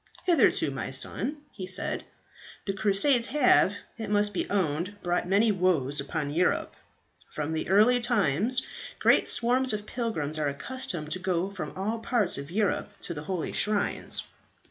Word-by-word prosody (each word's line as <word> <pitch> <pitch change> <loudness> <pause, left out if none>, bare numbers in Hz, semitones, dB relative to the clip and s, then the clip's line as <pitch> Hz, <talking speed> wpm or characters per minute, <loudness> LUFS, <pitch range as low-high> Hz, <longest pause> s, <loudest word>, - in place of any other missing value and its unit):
"Hitherto, 345 -3 +3
my - - -4
son," 295 +2 -2
he 185 -3 -7
said, 185 +1 -3 0.6
"the 195 - -1
Crusades 220 +5 +3
have, 255 -8 +4 0.2
it 220 - -4
must 205 0 +2
be - - -2
owned, 180 0 -1
brought 175 0 0
many 205 +4 +3
woes 165 -8 +1
upon 145 0 -3
Europe. 175 +5 0 0.5
From 150 +1 -4
the 160 - -3
early 215 +6 +5
times 235 - +1 0.3
great - - +4
swarms 250 +1 +2
of 210 0 -3
pilgrims 160 - -2
were 150 - +1
accustomed 155 - -4
to 185 - -1
go 185 0 -1
from 155 -7 -6
all 215 +4 -2
parts 225 - 0
of 140 +1 -8
Europe 205 +2 0
to 170 - -3
the 150 -1 -7
holy 180 -2 -3
shrines. 210 -1 +1
195 Hz, 155 wpm, -28 LUFS, 165-225 Hz, 0.6 s, early